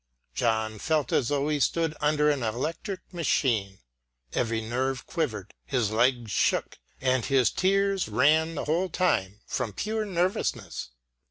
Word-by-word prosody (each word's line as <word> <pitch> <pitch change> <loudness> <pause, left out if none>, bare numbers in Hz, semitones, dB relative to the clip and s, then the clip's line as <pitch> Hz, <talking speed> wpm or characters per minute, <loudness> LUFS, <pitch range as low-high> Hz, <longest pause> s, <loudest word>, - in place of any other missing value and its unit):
John 110 -2 0
felt 155 +2 0
as 120 - +2
though 145 +1 0
he 150 -1 0
stood 165 +3 +1
under 150 0 +3
an 140 -2 -1
electric 155 - -3
machine. 115 - 0 0.5
Every 115 -1 0
nerve 125 +3 -2
quivered, - - -3
his 105 - 0
legs 120 0 +2
shook, - - +1 0.2
and 130 -2 +1
his 130 -5 +3
tears 195 0 +1
ran 160 +2 +3
the - - -3
whole 170 +5 +1
time 105 - 0
from 120 -5 -3
pure 215 - -2
nervousness. 190 - -1
135 Hz, 140 wpm, -27 LUFS, 115-165 Hz, 0.5 s, under